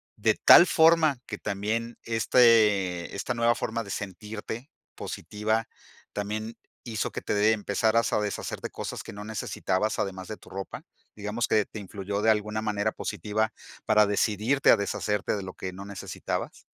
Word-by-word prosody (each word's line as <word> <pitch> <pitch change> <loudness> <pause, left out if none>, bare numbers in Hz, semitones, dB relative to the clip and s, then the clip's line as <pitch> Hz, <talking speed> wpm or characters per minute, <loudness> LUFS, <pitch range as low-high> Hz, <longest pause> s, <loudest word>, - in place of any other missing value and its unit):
de - - +2
tal 175 - +9
forma 160 -5 +4
que 105 - -6
también 110 +4 -3
este 105 -6 +3
esta 100 - -2
nueva 115 0 +2
forma 115 0 -3
de 100 - -11
sentirte 105 - -6 0.3
positiva 110 +2 -2 0.5
también 110 +2 -4 0.3
hizo 115 -3 -2
que - - -5
te - - -2
de 105 +1 +4
empezaras 110 +1 +1
a - - +3
deshacer 105 -1 -3
de - - -4
cosas - - -6
que - - -9
no 105 +1 -7
necesitabas 105 -1 -1
además 95 -1 -3
de 110 - -6
tu - - -17
ropa? 95 0 -6 0.3
Digamos 105 +3 -2
que, 105 -2 +3
¿te 110 - -9
influyó 100 0 -4
de 110 - +3
alguna 105 0 -1
manera 105 0 0
positiva 110 +1 -2 0.3
para 105 -1 +5
decidirte 105 +6 +2
a - - +6
deshacerte 105 0 -1
de 100 - -4
lo 95 0 -7
que 95 - -6
no 95 +2 -8
necesitabas? 100 -3 -5
105 Hz, 165 wpm, -27 LUFS, 100-115 Hz, 0.5 s, tal